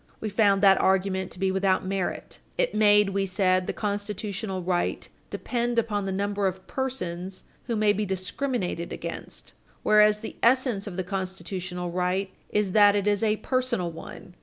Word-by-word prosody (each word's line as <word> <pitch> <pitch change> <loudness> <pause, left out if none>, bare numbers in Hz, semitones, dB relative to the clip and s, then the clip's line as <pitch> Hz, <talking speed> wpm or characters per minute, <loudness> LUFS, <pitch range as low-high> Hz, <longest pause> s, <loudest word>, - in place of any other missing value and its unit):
We 220 - -3
found 200 -1 +3
that 195 -1 +6
argument 190 -1 +1
to - - -10
be 190 0 +1
without 190 0 +1
merit. 190 -1 -3 0.2
It - - +1
made, 210 -1 +5
we 195 0 -1
said, 185 -1 +2
the - - 0
constitutional 205 -2 -3
right 175 0 -1 0.2
"depend 240 -1 -2
upon 210 -3 0
the - - -1
number 200 +1 0
of 190 0 -5
persons 190 -9 -4 0.2
who 235 - -2
may 210 -1 +3
be 210 - -1
discriminated 190 -1 -2
against, - - -6 0.3
whereas 210 0 +5
the 225 - -7
essence 240 -4 +2
of 185 -3 -6
the 185 - -1
constitutional 185 -1 -4
right 185 +2 -1 0.2
is 210 -2 0
that 205 0 +6
it 200 -1 0
is 205 -1 +2
a 215 -1 +2
personal 245 -10 -1
one. 165 +2 -10
195 Hz, 165 wpm, -26 LUFS, 185-210 Hz, 0.3 s, that